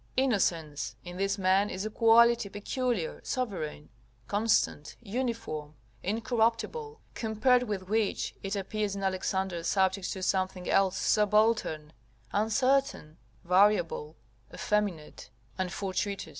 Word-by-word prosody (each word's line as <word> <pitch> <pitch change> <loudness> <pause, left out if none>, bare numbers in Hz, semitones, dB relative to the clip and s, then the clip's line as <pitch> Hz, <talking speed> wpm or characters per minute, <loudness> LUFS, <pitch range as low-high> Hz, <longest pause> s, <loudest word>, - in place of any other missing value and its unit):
Innocence, 175 - 0
in 175 0 -7
this 195 +1 0
man, 190 +2 +3
is 190 +3 -4
a 215 - -3
quality 230 -1 +5
peculiar, 210 - -2
sovereign, 185 - -4 0.4
constant, 205 -8 +1
uniform, 225 - -4 0.3
incorruptible, 235 - -1
compared 225 +3 +2
with 205 -6 -4
which, 215 0 0
it 195 +1 -3
appears 200 +1 -2
in 195 - -5
Alexander 190 -1 -1
subject 190 +1 +1
to 190 - -6
something 185 -1 -1
else 195 -1 +2
subaltern, 210 -7 +2 0.4
uncertain, 225 - +1 0.3
variable, 180 -4 +2 0.4
effeminate, 200 -7 -2 0.3
and 185 -1 -1
fortuitous. 195 +1 -3
200 Hz, 105 wpm, -29 LUFS, 185-225 Hz, 0.4 s, quality